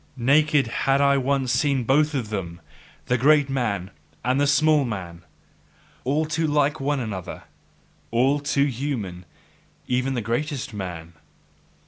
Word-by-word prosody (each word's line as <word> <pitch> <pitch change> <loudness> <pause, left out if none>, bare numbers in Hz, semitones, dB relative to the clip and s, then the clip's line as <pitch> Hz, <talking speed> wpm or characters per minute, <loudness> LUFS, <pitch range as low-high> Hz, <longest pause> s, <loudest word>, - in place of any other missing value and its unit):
Naked 145 +3 +3
had 135 +4 0
I 140 0 +4
once 135 -1 0
seen 130 +1 +1
both 150 +5 +2
of 120 -6 -2
them, 90 -5 -5 0.5
the 125 -1 0
greatest 145 +1 +4
man 100 -8 -2 0.3
and 130 +3 +2
the 145 - +3
smallest 150 -1 +3
man: 85 -5 -6 0.8
all 145 +5 +1
too 160 +1 -1
like 150 0 +1
one 140 +1 0
another 100 -7 -6 0.7
all 130 +5 +2
too 140 -1 +1
human, 115 -10 -4 0.6
even 130 +2 0
the 120 - -1
greatest 130 +3 -3
man! 85 -4 -6
135 Hz, 135 wpm, -24 LUFS, 115-145 Hz, 0.8 s, I